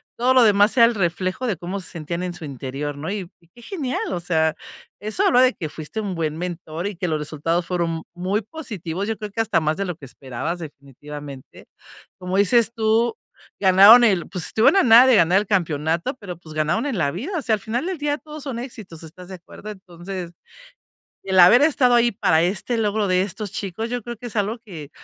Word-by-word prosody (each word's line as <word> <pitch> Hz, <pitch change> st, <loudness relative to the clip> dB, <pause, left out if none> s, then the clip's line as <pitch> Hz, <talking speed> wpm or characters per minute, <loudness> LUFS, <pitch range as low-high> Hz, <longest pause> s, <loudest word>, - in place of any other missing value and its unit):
todo 250 Hz, +2 st, +2 dB
lo 255 Hz, -, +6 dB
demás 205 Hz, +1 st, +4 dB
era 235 Hz, -, +8 dB
el 230 Hz, -1 st, +1 dB
reflejo 185 Hz, +5 st, -2 dB
de 200 Hz, -7 st, -1 dB
cómo 185 Hz, +3 st, -5 dB
se -, -, -8 dB
sentían 170 Hz, +2 st, -5 dB
en 180 Hz, -1 st, -4 dB
su 165 Hz, -, -8 dB
interior, 140 Hz, +2 st, -5 dB
¿no? 155 Hz, +6 st, -5 dB
Y 195 Hz, -4 st, -5 dB
y 170 Hz, -, -26 dB
qué 240 Hz, -, -18 dB
genial, 270 Hz, -, -4 dB
o 175 Hz, -, -2 dB
sea, 160 Hz, -2 st, +1 dB, 0.5 s
eso 210 Hz, 0 st, -1 dB
habla 250 Hz, -, +5 dB
de 255 Hz, 0 st, +4 dB
que 165 Hz, -, -5 dB
fuiste 155 Hz, +7 st, -7 dB
un 200 Hz, -4 st, -3 dB
buen 155 Hz, -2 st, -2 dB
mentor, 175 Hz, 0 st, -5 dB
y 205 Hz, -, -5 dB
que 180 Hz, 0 st, -3 dB
los 155 Hz, -1 st, -1 dB
resultados 165 Hz, +3 st, -2 dB
fueron, 170 Hz, -2 st, -2 dB
muy 185 Hz, +4 st, -1 dB
positivos, 200 Hz, -, -6 dB
yo 225 Hz, -, -2 dB
creo 210 Hz, -1 st, -7 dB
que 225 Hz, -, -1 dB
hasta 225 Hz, -5 st, +1 dB
más 155 Hz, 0 st, 0 dB
de 195 Hz, -, -2 dB
lo 180 Hz, -3 st, -4 dB
que 140 Hz, -, -12 dB
esperabas 135 Hz, +7 st, -5 dB
definitivamente. 145 Hz, -2 st, -11 dB, 0.5 s
Como 185 Hz, +1 st, -3 dB
dices 220 Hz, +3 st, +3 dB
tú, 225 Hz, +1 st, +1 dB, 0.4 s
ganaron 200 Hz, +5 st, +8 dB
el 190 Hz, -6 st, +1 dB
pues, 180 Hz, -4 st, -3 dB
estuvieron 225 Hz, -, +3 dB
a 390 Hz, -, +5 dB
nada 240 Hz, +2 st, +8 dB
de 255 Hz, -, +6 dB
ganar 175 Hz, 0 st, +4 dB
el 210 Hz, -, -4 dB
campeonato, 165 Hz, -, 0 dB
pero, 180 Hz, -5 st, -8 dB
pues, 160 Hz, -3 st, -13 dB
ganaron 160 Hz, -, 0 dB
en 265 Hz, -8 st, -2 dB
la 140 Hz, -4 st, 0 dB
vida, 310 Hz, -, -4 dB
o -, -, -2 dB
sea, 230 Hz, -5 st, +1 dB
al 210 Hz, -, -8 dB
final 240 Hz, +8 st, -3 dB
del 375 Hz, -3 st, -3 dB
día 290 Hz, 0 st, -1 dB
todo 305 Hz, 0 st, -11 dB
son 270 Hz, -5 st, -5 dB
éxitos, 215 Hz, -10 st, -9 dB
¿estás 175 Hz, +3 st, -12 dB
de 190 Hz, -, -7 dB
acuerdo? 190 Hz, +4 st, -12 dB
Entonces, 180 Hz, -2 st, -8 dB, 0.9 s
el 190 Hz, -1 st, +1 dB
haber 185 Hz, +9 st, +8 dB
estado 265 Hz, -5 st, +3 dB
ahí 235 Hz, 0 st, +3 dB
para 160 Hz, -5 st, +2 dB
este 195 Hz, +6 st, -1 dB
logro 210 Hz, -2 st, 0 dB
de 185 Hz, 0 st, +2 dB
estos 200 Hz, +1 st, -5 dB
chicos, 200 Hz, +3 st, -4 dB
yo 245 Hz, 0 st, -2 dB
creo 240 Hz, +1 st, -7 dB
que 245 Hz, -, -8 dB
es 235 Hz, -, -9 dB
algo 210 Hz, +4 st, -1 dB
que, 170 Hz, -11 st, -10 dB
190 Hz, 225 wpm, -22 LUFS, 165-225 Hz, 0.9 s, era